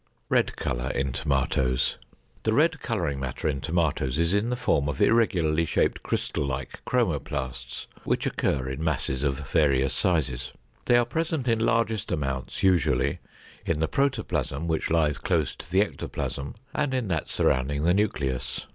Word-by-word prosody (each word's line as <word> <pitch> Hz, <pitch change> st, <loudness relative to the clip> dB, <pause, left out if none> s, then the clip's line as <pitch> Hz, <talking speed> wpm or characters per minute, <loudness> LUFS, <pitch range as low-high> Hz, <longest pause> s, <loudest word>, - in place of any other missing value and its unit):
=Red -, -, +2 dB
Color 60 Hz, +2 st, -2 dB
in 70 Hz, -1 st, 0 dB
Tomatoes.= 65 Hz, -2 st, +1 dB, 0.4 s
The 110 Hz, -, +1 dB
red 160 Hz, +5 st, +3 dB
coloring 85 Hz, -, -1 dB
matter 65 Hz, +1 st, -3 dB
in 70 Hz, -3 st, -1 dB
tomatoes 75 Hz, -4 st, 0 dB
is 85 Hz, +2 st, +2 dB
in 105 Hz, +3 st, +2 dB
the 125 Hz, -, 0 dB
form 70 Hz, -, +1 dB
of 70 Hz, -, -4 dB
irregularly 85 Hz, -9 st, +3 dB
shaped 80 Hz, -, +1 dB
crystal -, -, -2 dB
like 70 Hz, 0 st, -4 dB
chromoplasts, 70 Hz, -, -2 dB, 0.2 s
which -, -, 0 dB
occur 65 Hz, -2 st, 0 dB
in 65 Hz, +4 st, -4 dB
masses 65 Hz, -4 st, -1 dB
of 70 Hz, -1 st, -1 dB
various 70 Hz, -4 st, +3 dB
sizes. 70 Hz, -, 0 dB, 0.3 s
They 120 Hz, -, +5 dB
are 120 Hz, -, +4 dB
present 160 Hz, 0 st, -2 dB
in 115 Hz, -2 st, +3 dB
largest 115 Hz, -2 st, +1 dB
amounts 70 Hz, -5 st, -2 dB
usually 80 Hz, -8 st, +3 dB, 0.4 s
in 80 Hz, -2 st, -1 dB
the 80 Hz, -, +2 dB
protoplasm 90 Hz, -, -1 dB
which 80 Hz, -1 st, 0 dB
lies 80 Hz, -3 st, +2 dB
close -, -, 0 dB
to 75 Hz, -, -10 dB
the 95 Hz, +3 st, +4 dB
ectoplasm 70 Hz, -8 st, -3 dB, 0.2 s
and 145 Hz, -3 st, 0 dB
in 125 Hz, -4 st, -1 dB
that 80 Hz, -4 st, -1 dB
surrounding 70 Hz, +3 st, +1 dB
the 85 Hz, +2 st, +4 dB
nucleus. 75 Hz, -11 st, -1 dB
80 Hz, 155 wpm, -26 LUFS, 70-105 Hz, 0.4 s, They